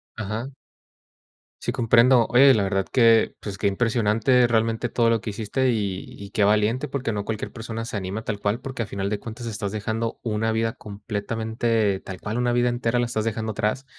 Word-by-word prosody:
Ajá. 110 +3 -4 1.1
Sí, - - -1
comprendo. 120 +1 +4
Oye, 135 +2 +7
la 105 - +2
verdad 95 -1 0
que, 115 -3 +4
pues, 100 -2 -6
qué - - -4
impresionante 115 +3 +2
realmente 115 0 +1
todo 115 -1 +2
lo 115 -1 +2
que 105 - -4
hiciste, 120 +5 0
y 100 -4 -2
y 100 0 -10
qué 105 - +1
valiente, 110 +7 +2
porque 130 -4 -2
no 105 -1 -3
cualquier 110 -1 -4
persona 115 0 -6
se 110 - -4
anima 100 +3 -4
tal 105 -3 -3
cual, 105 +4 -1
porque 130 -3 -4
al - - -8
final 100 -1 -3
de 105 - -2
cuentas 115 +1 -7
estás 105 -2 -4
dejando 110 +2 -3
una 110 0 -1
vida 115 0 0
completamente, 110 0 -2
tal 95 -1 -8
cual 110 +3 -3
una 120 0 +1
vida 120 0 +2
entera 120 0 0
la 120 - +1
estás 110 -2 -2
dejando 110 -1 -2
atrás 110 +6 -1
110 Hz, 195 wpm, -24 LUFS, 105-120 Hz, 1.1 s, Oye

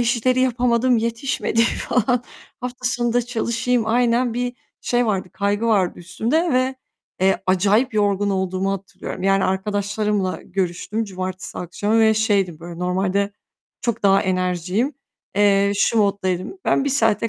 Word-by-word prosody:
işleri 240 +2 +2
yapamadım, 245 -1 +2
yetişmedi 230 0 0
falan. 245 +1 +1 0.4
Hafta 250 0 -6
sonu 240 -1 0
da 245 - +2
çalışayım. 235 0 -1
Aynen, 235 +1 +2
bir 245 0 -1 0.3
şey 245 -1 +1
vardı, 190 -3 -1
kaygı 205 +3 0
vardı 195 -6 +2
üstümde 250 - 0
ve, 255 +1 +1 0.5
eee, 190 0 +2
acayip 205 +6 +2
yorgun 205 -1 +1
olduğumu 190 0 -1
hatırlıyorum. 195 -1 -7
Yani, 195 0 +3
arkadaşlarımla 205 0 -1
görüştüm 190 +4 -2
cumartesi 185 -1 -6
akşamı 205 +5 0
ve 220 0 +5
şeydim, 200 -6 +1
böyle 170 0 -8
normalde 190 +2 0 0.5
çok 235 -2 -2
daha 195 -1 +4
enerjiğim. 185 - -1 0.4
Eee, 200 -1 +4
şu 225 - +2
moddaydım: 200 - 0
"Ben 275 - +2
1 - - 0
saate 225 -4 +2
210 Hz, 135 wpm, -21 LUFS, 190-240 Hz, 0.5 s, ve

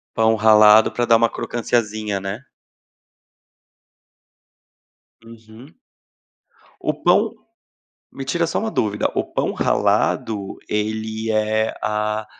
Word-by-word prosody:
Pão 110 0 +3
ralado 110 0 +6
pra 120 - -1
dar 115 -1 +5
uma 115 +1 +3
crocânciazinha, 110 -4 -2
né? 100 +7 -6 2.8
Uhum. 115 +5 -15 1.1
O - - 0
pão. - - +2 0.8
Me 135 - -7
tira 170 +5 -1
só - - -2
uma 220 0 -2
dúvida? 105 - -1
O - - 0
pão - - -1
ralado 100 -3 0
ele 110 +1 -3
é 110 0 0
a 105 0 -2
110 Hz, 100 wpm, -20 LUFS, 105-115 Hz, 2.8 s, ralado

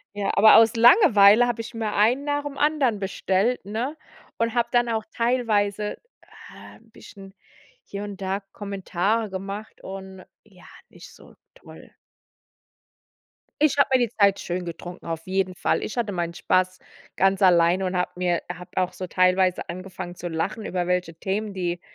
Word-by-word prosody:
ja, 205 -1 -2
aber 220 - +7
aus 225 +1 +5
Langeweile 235 - +6
habe 240 -1 -2
ich 230 +2 -10
mir 220 -2 -3
einen 240 +7 +2
nach 290 0 -1
dem 285 -1 -7
anderen 290 -7 +1
bestellt, 195 +3 -1
ne? 235 +9 -4 0.4
Und 230 0 -1
habe 235 -1 0
dann 240 -1 +2
auch 220 -2 -1
teilweise, 215 -4 0 0.5
ah, - - -14
bisschen, 195 -1 -15 0.5
hier 200 +1 -7
und 200 -1 -8
da 190 +1 -2
Kommentare 200 +2 -2
gemacht 195 +3 -7
und 190 -1 -9 0.2
ja, 190 -4 -20 0.2
nicht - - -14
so - - -18 0.2
toll. - - -15 1.7
Ich 300 -2 +3
hab 280 -1 +2
mir 260 - +5
die 240 -2 +1
Zeit 200 -3 +2
schön 180 +1 -4
getrunken, 175 +1 -9
auf 165 0 -5
jeden 185 -1 -1
Fall. - - 0
Ich 215 - -5
hatte 225 -4 -1
meinen 170 -2 -3
Spaß 185 +1 0 0.4
ganz 195 +1 +2
alleine 180 0 +4
und 185 - -2
hab 180 0 -2
mir 180 -1 0
hab 180 +1 -12
auch 185 -1 0
so 185 +1 -6
teilweise 185 0 +2
angefangen 185 0 -7
zu 175 0 -6
lachen, 165 +6 -3
über 180 -3 -2
welche 180 -2 -1
Themen, 200 +4 -3
die 175 -2 -3
200 Hz, 165 wpm, -24 LUFS, 185-225 Hz, 1.7 s, aber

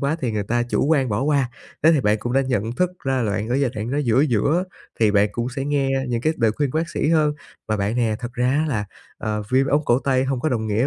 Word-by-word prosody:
quá 140 +2 0
thì 125 -4 -1
người 105 -1 -2
ta 120 +4 0
chủ 120 - 0
quan 140 -5 +2
bỏ 105 +3 -1
qua. 140 -3 +1 0.3
Thế 160 +2 +6
thì 150 - +3
bạn 105 -2 +2
cũng 120 +3 -4
đã 135 - +3
nhận 120 -4 -1
thức 180 +8 0
ra 130 -1 +1
là 105 -3 0
bạn 105 +2 -2
ở 125 - 0
giai 135 -3 +1
đoạn 110 +3 -4
nó 145 - 0
giữa 130 -2 +2
giữa, 150 - +2 0.4
thì 110 -2 +4
bạn 105 0 +3
cũng 120 +2 -2
sẽ 135 +1 -4
nghe 140 -2 0 0.2
những 120 -1 -1
cái 155 - +1
lời 115 -2 +2
khuyên 145 -3 0
của 155 - -3
bác 165 - -2
sĩ 155 - -1
hơn. 155 -2 +3 0.3
Và 110 - +1
bạn 105 +4 -1
nè, 115 -3 +1
thật 120 0 -6
ra 125 -1 0
á 150 +4 +1
là, 105 -7 -1 0.3
à, 110 0 -2
viêm 130 +1 +3
ống 145 +2 +1
cổ 120 +1 +3
tay 130 -1 +1
không 130 -3 -1
có 155 - 0
đồng 110 -3 -1
nghĩa 110 +5 +1
125 Hz, 295 wpm, -22 LUFS, 110-140 Hz, 0.4 s, Thế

